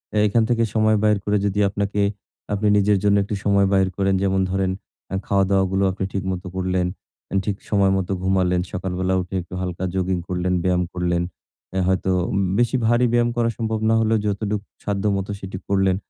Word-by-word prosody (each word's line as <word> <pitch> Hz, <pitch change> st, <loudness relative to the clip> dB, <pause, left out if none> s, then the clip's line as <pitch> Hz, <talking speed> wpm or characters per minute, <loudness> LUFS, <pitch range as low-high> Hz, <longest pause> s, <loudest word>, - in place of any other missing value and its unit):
এ -, -, +2 dB
এখান 110 Hz, +2 st, +3 dB
থেকে 115 Hz, -1 st, +2 dB
সময় 110 Hz, 0 st, +4 dB
বাইর 105 Hz, -1 st, +4 dB
করে 105 Hz, 0 st, +2 dB
যদি 100 Hz, 0 st, 0 dB
আপনাকে, 100 Hz, +1 st, -1 dB, 0.5 s
আপনি 105 Hz, +1 st, 0 dB
নিজের 100 Hz, 0 st, +3 dB
জন্য 100 Hz, -1 st, +4 dB
একটু 100 Hz, +1 st, -3 dB
সময় 100 Hz, -1 st, +4 dB
বাহির 95 Hz, -1 st, +3 dB
করেন, 95 Hz, -1 st, +2 dB
যেমন 95 Hz, -1 st, +2 dB
ধরেন; 95 Hz, -1 st, 0 dB, 0.4 s
আ -, -, 0 dB
খাওয়া-দাওয়া 95 Hz, -1 st, +3 dB
গুলো 95 Hz, +1 st, +1 dB
আপনি 95 Hz, +1 st, -4 dB
ঠিকমত 95 Hz, -1 st, -2 dB
করলেন, 90 Hz, -1 st, 0 dB, 0.6 s
ঠিক 105 Hz, -, -1 dB
সময় 100 Hz, -2 st, +3 dB
মতো 95 Hz, 0 st, -2 dB
ঘুমালেন, 90 Hz, -1 st, +2 dB
সকালবেলা 95 Hz, 0 st, -2 dB
উঠে 90 Hz, +1 st, -7 dB
একটু 90 Hz, -, -13 dB
হালকা 90 Hz, -1 st, -4 dB
জগিং 95 Hz, 0 st, 0 dB
করলেন, 90 Hz, 0 st, -1 dB
ব্যায়াম 90 Hz, -1 st, +2 dB
করলেন। 85 Hz, -1 st, 0 dB, 0.5 s
অ্যা 95 Hz, 0 st, 0 dB
হয়তো 95 Hz, 0 st, +1 dB, 0.2 s
উম 100 Hz, -, 0 dB, 0.2 s
বেশি 120 Hz, +2 st, +2 dB
ভারী 120 Hz, +2 st, +3 dB
ব্যায়াম 120 Hz, 0 st, +3 dB
করা 120 Hz, -1 st, +2 dB
সম্ভব 110 Hz, -1 st, -1 dB
না 115 Hz, -, +4 dB
হলেও, 110 Hz, 0 st, +2 dB
যতটুক 105 Hz, 0 st, -1 dB, 0.2 s
সাধ্যমত 100 Hz, -1 st, 0 dB
সেটি 95 Hz, -1 st, -6 dB
করলেন, 95 Hz, -1 st, +3 dB
95 Hz, 185 wpm, -22 LUFS, 95-105 Hz, 0.6 s, সময়